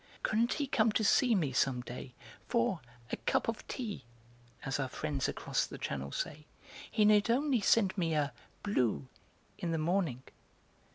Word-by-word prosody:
"Couldn't 230 +3 +2
he 290 - -1
come 230 -4 +3
to 225 +3 +4
me 150 -9 0
some 125 -1 +2
day 125 +1 -8 0.3
for 235 -7 +1 0.3
'a - - -1
cup - - 0
of 230 -1 -3
tea,' 225 -6 -4 0.6
as 135 0 -1
our 135 -2 -1
friends 75 - -2
across - - -1
the - - -8
channel 70 -1 -4
say; 150 - -4 0.4
he 215 -2 +3
need 210 +1 +5
only 260 0 +2
send 200 -2 +4
me 165 -5 0
a 145 -4 +1 0.3
'blue' 120 - +1 0.5
in 170 - -2
the 165 - 0
morning?" 160 -6 0
185 Hz, 160 wpm, -33 LUFS, -, 0.6 s, need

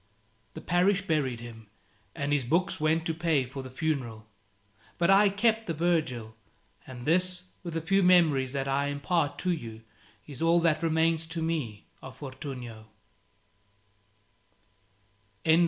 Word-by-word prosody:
The - - -7
parish 185 +3 +2
buried 135 -8 0
him, 115 -2 -10 0.5
and 145 -2 -1
his 145 -2 +2
books 170 +10 0
went 160 +1 +2
to 165 - 0
pay 160 -5 +1
for 135 +2 -7
the 130 - -8
funeral. 130 -6 -3 0.7
But 175 +2 +3
I 200 +1 +6
kept 220 +2 +1
the 165 - -2
Virgil; 150 -10 -1 0.5
and 125 -2 -9
this, 180 +2 +2 0.2
with 170 -3 -6
the 165 - -1
few 195 +5 +2
memories 160 -8 +4
that 135 -1 -2
I 140 +1 +1
impart 145 +1 0
to 185 - +1
you, 115 -9 -5 0.4
is 140 -2 -9
all 165 +1 +4
that 160 -2 +2
remains 165 0 +1
to 165 0 -4
me 140 -11 -3 0.2
of 130 - -10
Fortunio. 130 -5 -8
155 Hz, 140 wpm, -28 LUFS, 130-170 Hz, 0.7 s, I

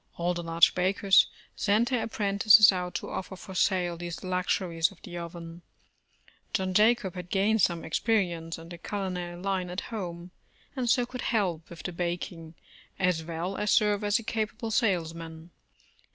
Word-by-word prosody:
All 175 +1 0
the 175 - -4
large 165 0 +4
bakers 195 +2 +4 0.3
sent 215 +4 +2
their 250 -3 0
ap 225 - -3
prentices 205 0 +6
out 180 -1 -4
to - - -4
offer 190 0 -5
for 190 +1 -10
sale 180 -2 +1
these 175 +1 -6
luxuries 180 -2 0
of 190 - -17
the 175 - -9
oven. 170 0 -8 0.9
John 185 -1 -1
Jacob 210 -2 +3
had 180 -1 -8
gained 205 +3 +2
some 170 -1 +1
experience 170 -4 0
in 165 +1 -11
the 175 -1 -9
culinary 180 -3 -4
line 190 -1 -2
at 180 +2 -3
home, 175 -4 -5 0.4
and 250 -3 -1
so 245 +1 +3
could 250 +1 -7
help 180 -8 -1
with 170 - -10
the - - -4
bak 175 0 -2
ing, 165 -2 -12 0.4
as 180 -4 +1
well 170 +4 -4
as 210 - -1
serve 210 0 +3
as 205 0 +2
a 230 - -6
capable 220 +1 -3
salesman. 165 -6 -1
180 Hz, 170 wpm, -28 LUFS, 170-205 Hz, 0.9 s, prentices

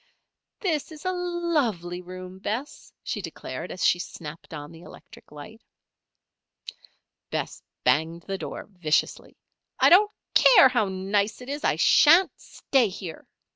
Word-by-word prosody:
"This 325 -6 -1
is 310 +2 -12
a 370 - +1
lovely 310 - -2
room, 185 +1 -10
Bess," 225 +9 -5
she 210 - -4
declared, 165 -2 -7
as 185 - -2
she 175 - +3
snapped 165 -2 -9
on 150 -1 -8
the 165 0 -13
electric 175 - -15
light. 150 +10 -12 1.7
Bess - - -4 0.2
banged 165 +2 +1
the 195 -1 -5
door - - -7
viciously. 170 -5 -1 0.4
"I - - +6
don't 410 +4 +6 0.2
care 450 - +7
how 240 -4 +1
nice 200 +2 -1
it 250 +1 -10
is! 290 +2 -4
I - - +2
sha'n't 340 +5 +5
stay 265 -5 0
here!" 180 -4 -8
195 Hz, 135 wpm, -25 LUFS, -, 1.7 s, care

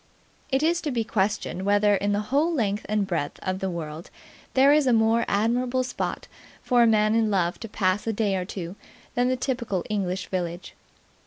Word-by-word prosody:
It 265 +2 +2
is 340 +2 +2
to 305 - -2
be 240 -4 0
questioned 200 -3 -1
whether 205 +1 +3
in 200 +1 +1
the 205 +1 +1
whole 310 +5 +3
length 210 -9 -1
and 210 -1 +1
breadth 165 -6 -3
of 185 0 -2
the 190 - -2
world 160 -2 -6 0.5
there 275 +2 +6
is 300 -2 +3
a 250 - +4
more 225 +1 +3
admirable 245 +5 +1
spot 255 - -4 0.4
for 245 -2 +3
a 235 - +6
man 215 -1 +3
in 225 -1 +2
love 180 -3 0
to 225 - -7
pass 195 0 0
a - - +2
day 205 -2 0
or 185 - -1
two 180 -1 -6 0.4
than 245 +1 +1
the 255 - +2
typical 240 -8 -2
English 185 -3 -1
village. 175 -1 -4
210 Hz, 195 wpm, -25 LUFS, 190-245 Hz, 0.5 s, there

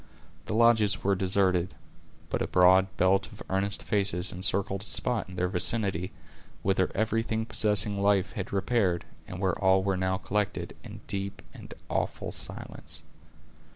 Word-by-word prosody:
The 105 - -3
lodges 110 -3 +4
were 100 - +2
deserted; 95 -2 +1 0.6
but - - -1
a - - 0
broad 95 +1 +5
belt 95 +1 +2
of - - -11
earnest 100 +1 0
faces 95 -3 +2
encircled 95 +2 -1
a - - -1
spot 115 -3 0
in 90 - -9
their 90 0 0
vicinity, 95 -1 -1 0.5
whither 95 -1 +1
everything 110 +1 0
possessing 105 -2 +2
life 100 -1 +2
had 100 -3 -5
repaired, 100 -3 0 0.2
and 90 - -7
where 95 -2 0
all 95 -1 +3
were 95 -1 0
now 95 0 0
collected, 105 +1 -2
in - - -10
deep 100 0 -4
and - - -11
awful - - -2
silence. - - -5
95 Hz, 150 wpm, -28 LUFS, 95-105 Hz, 0.6 s, broad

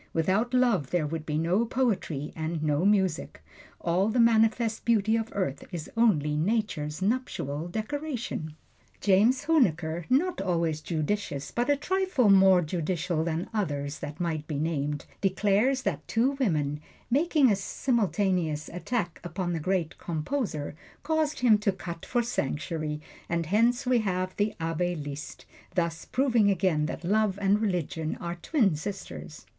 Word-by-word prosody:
Without 190 +9 +1
love 240 - +2
there 175 -4 +1
would 155 +1 -4
be 150 -1 -1
no 175 +7 +2
poetry 220 - -1
and 160 0 -3
no 150 +1 +1
music. 190 -5 +1 0.4
All 180 +5 +1
the 240 +3 0
manifest 225 0 +3
beauty 220 -1 +3
of 225 0 -1
earth 165 -9 -2
is 170 -4 -6
only 160 -11 +3
Nature's 160 -4 -1
nuptial 175 - -1
decoration. 220 - -4 0.4
James 210 +8 +3
Huneker, 170 - +2
not 325 - +2
always 170 -4 0
judicious, 155 -2 -2
but 240 +3 -1
a 290 - +5
trifle 365 - +2
more 190 -2 +6
judicial 165 0 -1
than 165 +2 -2
others 145 -8 -2
that 150 +1 -7
might 160 -4 -2
be 150 - -3
named, 150 -2 -2 0.2
declares 210 +7 +2
that - - -2
two 235 +5 +2
women, 155 - 0 0.3
making 290 -2 +4
a - - +4
simultaneous 190 - 0
attack 180 0 -2
upon 175 +1 -3
the 165 - -1
great 175 0 -1
composer, 160 - -3 0.3
caused 310 -1 0
him 225 -4 +5
to 210 -1 +2
cut 170 -3 -8
for 240 -1 +1
sanctuary, 150 - -2 0.3
and 170 -1 0
hence 230 - +2
we 250 -1 +3
have 185 -3 -2
the 210 +1 0
Abbe 165 +2 -1
Liszt, 145 -1 -7 0.3
thus 170 -2 -1
proving 240 -6 +2
again 180 -6 +1
that 160 - -6
love 205 +1 +2
and 200 +1 +2
religion 170 -6 -1
are 175 0 -5
twin 225 - +2
sisters. 115 - -7
185 Hz, 145 wpm, -28 LUFS, 160-225 Hz, 0.4 s, more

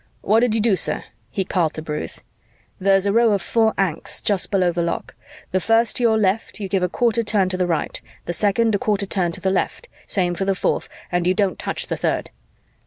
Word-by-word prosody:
What 215 +2 +3
did 235 -2 +2
you 225 - +1
do, 220 -3 +3
sir?" - - +1 0.3
he 195 -3 -2
called 170 -4 0
to 155 - -5
Bruce. 150 - -5 0.6
"There's 195 0 +3
a 200 - +1
row 230 -1 +4
of 200 - 0
four 225 -1 +2
ankhs 185 -6 0
just 200 -3 +1
below 185 -4 +2
the 170 0 -2
lock. 170 0 -3 0.4
The 185 - +2
first 225 +3 +2
to 250 - +1
your 225 -2 +4
left 210 +2 0
you 200 - -3
give 190 0 0
a 180 - +1
quarter 235 +3 +1
turn 205 -4 +2
to 185 - 0
the 180 -1 +1
right, 165 -3 -2 0.2
the 175 - -2
second 215 +4 +2
a 200 - +1
quarter 205 -1 0
turn 185 -3 0
to - - -6
the 190 - +1
left, 485 - -2 0.2
same 180 -3 +1
for 195 +2 -2
the 195 0 +1
fourth, - - -1 0.2
and 175 0 +1
you 185 - +3
don't 195 -1 0
touch - - -3
the - - -3
third." - - -1
195 Hz, 235 wpm, -21 LUFS, 180-220 Hz, 0.6 s, row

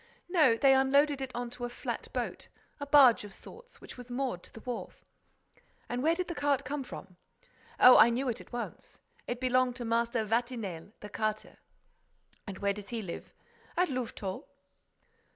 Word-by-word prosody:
"No, 310 -10 +4
they 270 +2 +5
unloaded 275 +2 +3
it 265 - -3
onto 245 0 -5
a 245 - -2
flat - - -5
boat, - - -4 0.3
a 285 - -5
barge 275 -7 +6
of 205 - -9
sorts, - - -14
which - - -12
was 245 0 -10
moored 245 -7 -2
to - - -12
the 225 - -12
wharf." 245 0 -7 0.8
"And 245 +1 -3
where 320 +4 +3
did 365 0 -3
the 345 - -4
cart 285 -3 0
come 280 +1 -3
from?" 185 -7 -10 0.6
"Oh, 250 - +9
I - - +8
knew 250 +3 -1
it 240 -1 -2
at - - -16
once. 240 -1 -7 0.3
It 245 - -3
belonged 255 -1 +2
to 245 -1 -5
Master 230 0 0
Vatinel, 225 -6 -2
the 210 - -8
carter." 215 0 -3 0.9
"And 195 -2 -6
where 200 0 0
does 200 0 -9
he 230 -2 -4
live?" 170 -3 -7 0.5
"At 360 +1 +3
Louvetot." 245 -3 -4
245 Hz, 175 wpm, -30 LUFS, 225-270 Hz, 0.9 s, Oh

